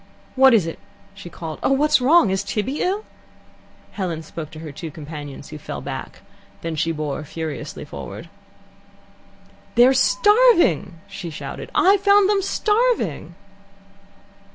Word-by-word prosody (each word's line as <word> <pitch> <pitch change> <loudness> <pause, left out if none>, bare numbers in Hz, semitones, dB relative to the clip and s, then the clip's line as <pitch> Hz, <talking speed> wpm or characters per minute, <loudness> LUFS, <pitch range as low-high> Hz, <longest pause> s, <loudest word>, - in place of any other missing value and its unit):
"What 265 -2 +6
is 200 -7 +3
it?" 165 - -6 0.3
she 200 -3 -10
called. 160 -2 -7
"Oh, 270 - +2
what's 300 0 +3
wrong? 270 - +5
Is 190 0 0
Tibby 215 +8 -3
ill?" 400 +4 -1 0.9
Helen 175 -5 -4
spoke 155 0 -8
to 155 - -12
her 155 -2 -7
two 160 +3 -7
companions, 145 -2 -9
who 150 - -8
fell - - -6
back. - - -7 0.4
Then 165 -1 -4
she 165 +2 0
bore 155 -2 -3
forward - - -14
furiously. 160 -1 -6 1.9
"They're 245 +3 +6
starving!" 415 - +3
she 195 -3 -7
shouted. 155 - -7
"I 390 +2 +5
found 400 0 +4
them 405 -1 +2
starving!" 415 - 0
195 Hz, 135 wpm, -21 LUFS, -, 1.9 s, What